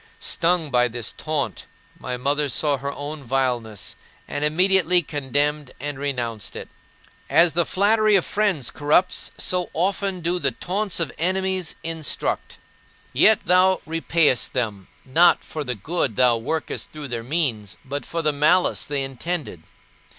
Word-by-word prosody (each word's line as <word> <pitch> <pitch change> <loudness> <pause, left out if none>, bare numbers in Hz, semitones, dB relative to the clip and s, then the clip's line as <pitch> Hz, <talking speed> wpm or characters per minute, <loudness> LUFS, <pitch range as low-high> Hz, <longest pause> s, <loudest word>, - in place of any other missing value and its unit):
Stung 165 -3 0
by 125 -1 +3
this 120 -1 -4
taunt, 155 -3 -3 0.3
my 125 -1 -4
mother 145 +3 0
saw 145 +3 +1
her 140 +1 -4
own 145 0 -7
vileness 120 -6 -2 0.3
and 145 - -3
immediately 180 +2 +3
condemned 145 0 -1
and 145 0 -5
renounced 120 -7 -3
it. - - -7 0.6
As 165 +3 +6
the 170 +1 +1
flattery 215 +2 +3
of 185 - +3
friends 195 - 0
corrupts, 150 +5 +1
so 180 -1 -1
often 190 +1 0
do 175 +2 0
the 140 -6 +1
taunts 190 - -2
of 165 - -1
enemies 185 0 -1
instruct. 165 -2 -2 0.6
Yet 220 0 +5
thou 185 +1 +4
repayest 160 -4 +1
them, 105 -7 -3 0.2
not 170 +7 +4
for 155 - -5
the 125 -3 -3
good 135 - -2
thou 125 -2 +4
workest 140 +8 -3
through 150 -2 -8
their 120 -1 -3
means, 120 - -1
but 140 +2 -4
for 165 0 -4
the 150 -1 +2
malice 155 +6 +3
they 140 -1 -2
intended. 135 - -4
150 Hz, 145 wpm, -23 LUFS, 130-175 Hz, 0.6 s, As